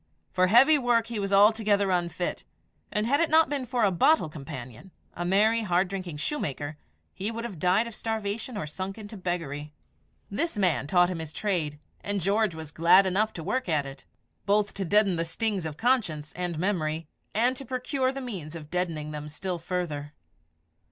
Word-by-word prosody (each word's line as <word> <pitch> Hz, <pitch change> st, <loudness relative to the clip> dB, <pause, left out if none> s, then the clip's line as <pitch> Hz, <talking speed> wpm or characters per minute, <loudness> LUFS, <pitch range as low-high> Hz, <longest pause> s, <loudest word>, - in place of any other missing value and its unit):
For 185 Hz, 0 st, +3 dB
heavy 270 Hz, +9 st, +6 dB
work 240 Hz, -3 st, +2 dB
he 230 Hz, -2 st, -4 dB
was 195 Hz, 0 st, -2 dB
altogether 205 Hz, -1 st, +4 dB
unfit; 175 Hz, 0 st, -1 dB, 0.5 s
and 210 Hz, +1 st, 0 dB
had 280 Hz, +5 st, +2 dB
it 335 Hz, -, +2 dB
not 320 Hz, +1 st, +5 dB
been 275 Hz, -3 st, -2 dB
for 245 Hz, -1 st, 0 dB
a 200 Hz, -, +4 dB
bottle 185 Hz, -, +3 dB
companion 135 Hz, -, -9 dB, 0.2 s
a 175 Hz, -, -4 dB
merry, 210 Hz, +5 st, +3 dB
hard 180 Hz, -2 st, +1 dB
drinking 185 Hz, -5 st, -5 dB
shoemaker 150 Hz, -, -3 dB, 0.4 s
he 200 Hz, +3 st, -3 dB
would 230 Hz, 0 st, -5 dB
have 205 Hz, -9 st, -6 dB
died 185 Hz, +6 st, +3 dB
of 235 Hz, -, -7 dB
starvation 220 Hz, +2 st, -3 dB
or 155 Hz, -, -3 dB
sunk 185 Hz, +6 st, -5 dB
into 215 Hz, 0 st, -9 dB
beggary. 165 Hz, -6 st, -4 dB, 0.6 s
This 320 Hz, +5 st, -2 dB
man 180 Hz, -8 st, +1 dB
taught 175 Hz, +2 st, +4 dB
him 175 Hz, -, -4 dB
his 160 Hz, -2 st, -6 dB
trade, 160 Hz, -6 st, -1 dB, 0.3 s
and 205 Hz, 0 st, -1 dB
George 200 Hz, 0 st, +1 dB
was 160 Hz, -2 st, -8 dB
glad 170 Hz, +5 st, +6 dB
enough 205 Hz, +4 st, +1 dB
to 165 Hz, -, -6 dB
work 255 Hz, +3 st, -1 dB
at 150 Hz, -3 st, +1 dB
it, 135 Hz, 0 st, -10 dB, 0.4 s
both 205 Hz, 0 st, +2 dB
to 195 Hz, -, -3 dB
deaden 200 Hz, -1 st, +3 dB
the 165 Hz, -, 0 dB
stings 190 Hz, +1 st, -1 dB
of 150 Hz, -1 st, -7 dB
conscience 185 Hz, -, 0 dB
and 175 Hz, -2 st, -3 dB
memory, 160 Hz, -4 st, -1 dB, 0.3 s
and 245 Hz, +4 st, +3 dB
to 275 Hz, -, -5 dB
procure 260 Hz, 0 st, -1 dB
the 270 Hz, 0 st, -6 dB
means 180 Hz, -, -6 dB
of 155 Hz, -2 st, -9 dB
deadening 165 Hz, -4 st, -2 dB
them 150 Hz, 0 st, -6 dB
still 175 Hz, +3 st, -4 dB
further. 160 Hz, -4 st, -3 dB
190 Hz, 185 wpm, -27 LUFS, 160-220 Hz, 0.6 s, heavy